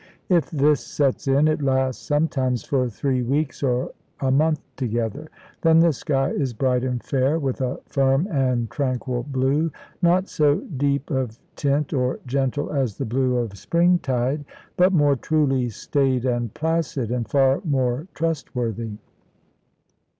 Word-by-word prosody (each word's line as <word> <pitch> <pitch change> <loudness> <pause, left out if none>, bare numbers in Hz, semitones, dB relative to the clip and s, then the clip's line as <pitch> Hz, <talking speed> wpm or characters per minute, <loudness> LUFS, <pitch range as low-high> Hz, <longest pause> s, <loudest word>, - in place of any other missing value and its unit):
If 175 -4 +3
this 150 -1 +2
sets 140 -2 -1
in, 140 +3 +4
it 155 -1 +1
lasts 130 -2 0
sometimes 135 -5 0
for 130 -3 0
three 130 +3 -1
weeks 140 +4 -1
or 125 -2 0 0.3
a 135 -1 +1
month 155 +2 +3 0.2
together. 120 +3 -2 0.3
Then 165 -1 +5
the 165 -1 +5
sky 135 -1 0
is 130 -5 -2
bright 125 +1 +1
and 125 -2 -2
fair, 135 +3 +1
with 135 -4 -2
a 130 0 -2
firm 135 +5 +2
and 130 -5 +1
tranquil 130 -3 -2
blue, 140 +4 0 0.3
not 180 +2 +3
so 145 -1 +2
deep 140 0 -2
of 130 -5 -2 0.2
tint 145 +1 0
or 125 -2 0
gentle 135 +2 -1
as 130 -8 -1
the 135 - -2
blue 125 +2 +1
of 110 -5 -3
spring 175 - +3
tide, 130 +2 -1 0.3
but 180 +2 +4
more 145 -5 +4
truly 135 -3 +1
staid 130 +2 0
and 120 -3 -1
placid, 155 -7 -1
and 120 -2 -2
far 135 -1 +3
more 135 -1 0
trustworthy. 120 -9 -3
135 Hz, 150 wpm, -23 LUFS, 125-150 Hz, 0.3 s, Then